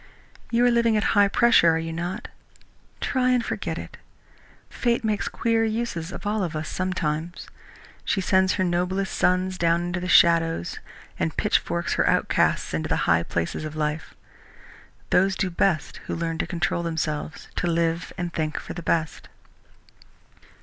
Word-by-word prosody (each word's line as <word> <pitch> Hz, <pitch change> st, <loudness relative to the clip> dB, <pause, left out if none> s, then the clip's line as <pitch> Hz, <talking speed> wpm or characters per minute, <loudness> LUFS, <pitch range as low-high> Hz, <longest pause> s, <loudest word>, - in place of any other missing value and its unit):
You 240 Hz, +1 st, +3 dB
are 245 Hz, -, +5 dB
living 235 Hz, -2 st, +3 dB
at 210 Hz, -, +1 dB
high 205 Hz, -2 st, +5 dB
pressure, 225 Hz, -4 st, +5 dB
are 160 Hz, -, +3 dB
you 165 Hz, 0 st, -4 dB
not? 175 Hz, +3 st, -4 dB, 0.7 s
Try 255 Hz, -1 st, +1 dB
and 250 Hz, -2 st, +2 dB
forget -, -, -3 dB
it. -, -, -8 dB, 0.7 s
Fate 240 Hz, -1 st, -1 dB
makes 215 Hz, -2 st, -1 dB
queer 230 Hz, -1 st, +1 dB
uses 220 Hz, -7 st, -2 dB
of 190 Hz, -, -8 dB
all 210 Hz, 0 st, 0 dB
of 170 Hz, -3 st, -3 dB
us 155 Hz, 0 st, -4 dB
sometimes. 175 Hz, -2 st, -3 dB, 0.6 s
She 195 Hz, -, 0 dB
sends 190 Hz, 0 st, +3 dB
her 190 Hz, -, 0 dB
noblest 180 Hz, +2 st, -1 dB
sons 185 Hz, +1 st, +1 dB
down 170 Hz, 0 st, +2 dB
into 175 Hz, +1 st, -2 dB
the 180 Hz, -, -4 dB
shadows 165 Hz, -, +3 dB, 0.4 s
and 80 Hz, -1 st, -2 dB
pitchforks -, -, 0 dB
her -, -, +2 dB
outcasts -, -, +1 dB
into 80 Hz, 0 st, -2 dB
the -, -, +2 dB
high 85 Hz, -1 st, +4 dB
places 85 Hz, -, -3 dB
of 155 Hz, 0 st, -6 dB
life. 150 Hz, +1 st, -3 dB, 1.0 s
Those 190 Hz, +1 st, +3 dB
do 190 Hz, -2 st, -1 dB
best 170 Hz, -4 st, 0 dB
who -, -, -2 dB
learn 165 Hz, -1 st, -3 dB
to -, -, -1 dB
control 175 Hz, -1 st, -1 dB
themselves, 160 Hz, -2 st, -3 dB
to 175 Hz, -, 0 dB
live 165 Hz, -1 st, 0 dB
and 175 Hz, -1 st, -4 dB
think 155 Hz, -1 st, -2 dB
for -, -, -8 dB
the 175 Hz, -, -6 dB
best." 160 Hz, -1 st, -1 dB
175 Hz, 165 wpm, -24 LUFS, 165-195 Hz, 1.0 s, are